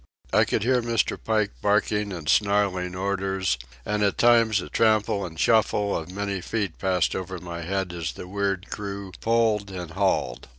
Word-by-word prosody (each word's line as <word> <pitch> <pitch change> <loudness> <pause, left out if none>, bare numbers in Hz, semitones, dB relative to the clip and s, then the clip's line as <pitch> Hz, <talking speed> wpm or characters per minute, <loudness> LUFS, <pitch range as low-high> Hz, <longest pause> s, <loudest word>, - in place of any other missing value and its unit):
I - - +5
could - - 0
hear 125 +1 +3
Mr. 115 -1 0
Pike 110 -2 +1
barking 105 0 +1
and 85 -5 -6
snarling 100 -3 +2
orders, 95 -6 -1 0.3
and 105 0 -1
at 100 -1 +1
times 115 -3 +5
a - - -6
trample 110 -3 +2
and 80 -2 -11
shuffle 105 0 +2
of 80 +2 -4
many 100 -1 -3
feet 100 -2 -3
passed 95 -2 +1
over 95 0 -4
my 85 -1 -7
head 95 +1 -2
as 85 -4 -4
the 90 - -9
weird 100 0 -2
crew 100 -2 -5
pulled 110 -3 +2
and 90 -3 -6
hauled. - - 0
100 Hz, 170 wpm, -25 LUFS, 90-105 Hz, 0.3 s, I